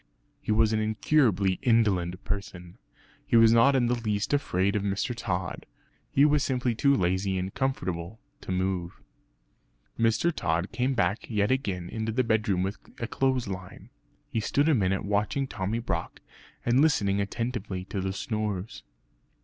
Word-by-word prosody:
He - - -2
was 110 0 +3
an 110 - +2
incurably 110 -3 +2
indolent 100 -8 +2
person; 90 -4 -6 0.4
he - - 0
was 115 -1 +7
not 115 +4 +5
in 125 -2 +3
the 120 - +1
least 105 -1 -1
afraid 100 -8 +1
of 105 - +1
Mr. 100 +5 -1
Tod; 95 -5 -3 0.4
he 140 - +4
was 150 -1 +3
simply 125 -2 0
too 140 +5 +3
lazy 95 0 0
and 95 +1 -3
comfortable 95 -7 -3 0.2
to - - -6
move. 90 -1 -2 1.0
Mr. 115 +9 +2
Tod 85 - -1
came 130 +2 0
back 110 -2 0
yet 105 -1 +1
again 95 -9 -1
into 110 +3 -3
the 130 +3 +1
bedroom 110 -5 +1
with 100 +1 -3 0.2
a 120 - -2
clothes 130 0 0
line. 95 -1 -8 0.4
He 115 - -2
stood 140 +7 +1
a 160 - +4
minute 95 -6 +1
watching 105 +8 0
Tommy 105 -3 -3
Brock 120 - -3 0.5
and 120 +3 +4
listening 100 -10 +2
attentively 100 -3 -3
to 100 0 -4
the 95 0 -2
snores. 105 0 -3
105 Hz, 155 wpm, -27 LUFS, 95-120 Hz, 1.0 s, was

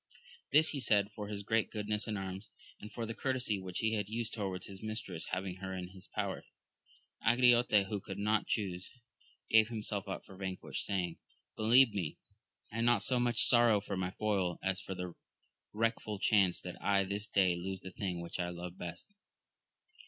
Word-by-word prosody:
This 155 +3 +7
he 145 - -1
said 105 -4 +3
for 105 -1 -6
his 100 -1 -4
great 110 +2 +1
goodness 105 0 -2
in 105 -2 -2
arms, 95 +1 -5 0.3
and 105 - -9
for 115 - -4
the 115 - -4
courtesy 125 -5 0
which 95 -1 -6
he 110 0 +1
had 105 -2 -1
used 115 0 -3
toward 95 -4 -3
his 95 -1 -9
mistress, 110 -6 -4
having 95 0 -3
her 95 0 -5
in 90 -1 -5
his 95 -1 -13
power. - - -3 0.8
Angriote, 120 -3 +5
who 100 +1 -3
could 95 - -7
not 105 +1 +1
chuse, 95 -4 -2 0.6
gave 110 -1 +6
himself 105 -3 -3
up 95 - -5
for 95 - -13
vanquished, 95 -1 -3
saying. 90 -4 -2 0.4
Believe 115 +2 +6
me, 90 -7 -3 0.5
I 115 +1 -2
not 120 -3 +3
so 125 -2 +2
much 120 -1 +4
sorrow 120 -3 +5
for 100 0 -4
my 90 -1 -1
foil, 95 -3 0
as 95 0 0
for 95 - -5
the 90 -1 -5 0.6
wreckful 110 -1 -1
chance 95 -4 +3
that - - -8
I 100 -1 +3
this 100 +2 -3
day 95 -4 +3
lose 95 +2 -4
the 95 - -8
thing 90 -2 -3
which 85 +1 -6
I 90 0 0
love 90 +1 -7
best. 90 - -8
100 Hz, 185 wpm, -33 LUFS, 95-110 Hz, 0.8 s, This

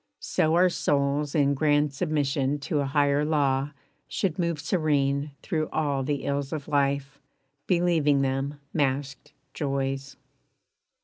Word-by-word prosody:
So 160 +1 +1
our 180 +1 +5
souls 145 -1 0
In 140 -2 +3
grand 145 0 +2
submission 145 -2 0
to 150 +1 -1
a 140 - 0
higher 145 0 +2
law 140 -3 +1 0.4
Should 185 -3 -2
move 170 -3 0
serene 145 -4 +1
through 155 -2 -1
all 145 -3 0
the 140 +1 -2
ills 140 -1 -2
of 150 -3 -4
life, 140 -1 0 0.5
Believing 165 -6 +3
them 135 +2 -2
masked 140 0 -1 0.2
joys. 135 -1 -3
145 Hz, 125 wpm, -26 LUFS, 140-155 Hz, 0.5 s, our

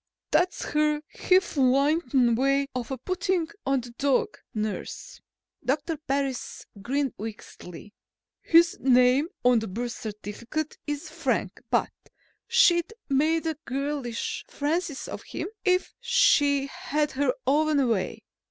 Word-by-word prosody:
"That's 360 0 +1
her 300 0 +1
hifalutin 275 -6 +3
way 275 +3 +2
of 250 0 -4
putting 365 -2 0 0.2
on 270 -1 +2
the 240 0 -10
dog, 285 - +1 0.2
nurse," 215 - -5 0.4
Doctor 295 +5 -1
Parris 275 -3 -3 0.2
grinned 275 +3 -1
wickedly. 210 -3 -9 0.5
"His 335 0 +5
name 255 +3 +4 0.2
on 250 -2 +6
the 220 - -5
birth 235 +5 -3
certificate 225 +8 -5
is 295 +3 -3
Frank - - -2
but - - +1 0.6
she'd 445 -6 +4 0.2
make 315 +4 +2
a 320 -2 -1
girlish 275 -2 -3
Francis 310 0 -2
of - - -6
him - - -5
if 365 -1 +1
she 290 - +3
had 295 +2 -2
her 270 -1 0
own 290 0 +3
way. 210 -5 -1
280 Hz, 115 wpm, -26 LUFS, 250-315 Hz, 0.6 s, on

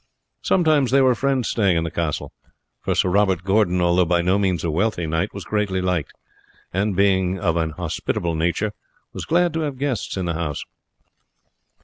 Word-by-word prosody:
Sometimes 155 -7 +2
there 135 +1 +4
were 130 -1 +5
friends 135 0 0
staying 95 -6 +2
in 80 - 0
the 85 - -4
castle; 80 -3 -3 0.5
for - - -1
Sir - - +2
Robert 95 -2 +2
Gordon, 95 -2 +2
although 90 +1 +3
by 85 0 +1
no 95 +3 +2
means 95 -5 0
a 85 - 0
wealthy 90 +1 0
knight, 80 +1 -1
was - - -7
greatly 105 -3 -1
liked, 90 -4 -1 0.6
and, 100 +1 0
being 95 -1 +2
of 85 -4 0
an 80 -1 0
hospitable 85 +1 -3
nature, 85 +6 0 0.4
was - - -6
glad 175 0 +2
to 165 - -1
have 145 -4 -3
guests 130 -7 -2
in 95 - -2
the 85 - -1
house. 80 -3 -3
95 Hz, 180 wpm, -22 LUFS, 85-110 Hz, 0.6 s, were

